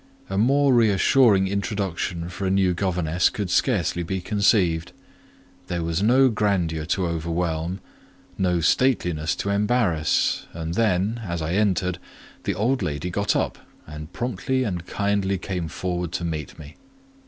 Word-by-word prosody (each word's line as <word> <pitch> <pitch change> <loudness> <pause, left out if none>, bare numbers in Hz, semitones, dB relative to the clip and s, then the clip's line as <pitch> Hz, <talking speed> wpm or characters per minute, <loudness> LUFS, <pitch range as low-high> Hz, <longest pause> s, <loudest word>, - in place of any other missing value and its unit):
A 95 - -1
more 135 +4 +4
reassuring 110 -2 +4
introduction 95 -4 -2
for 95 +2 -4
a - - +1
new 95 -1 +2
governess 90 -2 +1
could 100 -4 -4
scarcely 90 - +1
be 95 +3 -3
conceived; 90 -4 +1 0.7
there 85 -1 -2
was 85 +2 -1
no 130 +5 +5
grandeur 90 -8 0
to 95 +1 0
overwhelm, 85 +1 -2 0.5
no 90 -3 +1
stateliness 85 -6 +1
to 100 - -2
embarrass; 100 -6 +1
and 80 0 -4
then, 105 +2 +1
as 85 -4 -3
I 80 +2 -2
entered, 90 -3 +1 0.5
the 100 - 0
old 125 +7 +1
lady 75 +4 -3
got 100 +3 0
up - - -1 0.3
and 75 +1 -9
promptly 130 +3 -1
and 90 -6 -4
kindly 100 -1 0
came 90 -2 -4
forward 90 0 -3
to 90 - -2
meet 75 -4 -5
me. 75 0 -12
95 Hz, 140 wpm, -24 LUFS, 85-105 Hz, 0.7 s, no